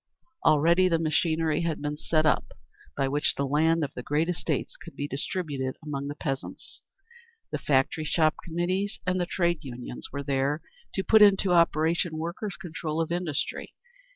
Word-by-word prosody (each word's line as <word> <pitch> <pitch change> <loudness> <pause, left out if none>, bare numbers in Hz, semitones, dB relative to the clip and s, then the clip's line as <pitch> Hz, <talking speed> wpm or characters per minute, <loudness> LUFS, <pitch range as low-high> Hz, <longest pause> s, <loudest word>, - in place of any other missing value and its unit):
Already 170 +5 +5
the 165 - +3
machinery 160 0 +1
had 165 -2 -1
been 145 0 -3
set 155 +1 +1
up 150 - +1 0.4
by 135 -1 +1
which 145 +2 +1
the 140 - -1
land 160 +4 +2
of 145 - -4
the - - -6
great 150 +5 0
estates 180 - -2
could - - -12
be 145 - -3
distributed 140 -3 -3
among 140 -2 -3
the 145 - -5
peasants. 135 -2 -5 0.7
The - - -2
Factory 140 +3 +1
Shop 155 0 +3
Committees 185 +5 -2
and 185 0 +1
the 175 - -1
Trade 175 -3 +1
Unions 125 -3 -7
were 140 0 -4
there 140 +2 0 0.3
to 190 - 0
put 220 +1 +5
into 195 -2 +6
operation 165 0 +2
workers' 170 +5 -4
control 165 -3 -4
of 165 0 -1
industry. 175 -4 -2
160 Hz, 165 wpm, -27 LUFS, 145-175 Hz, 0.7 s, into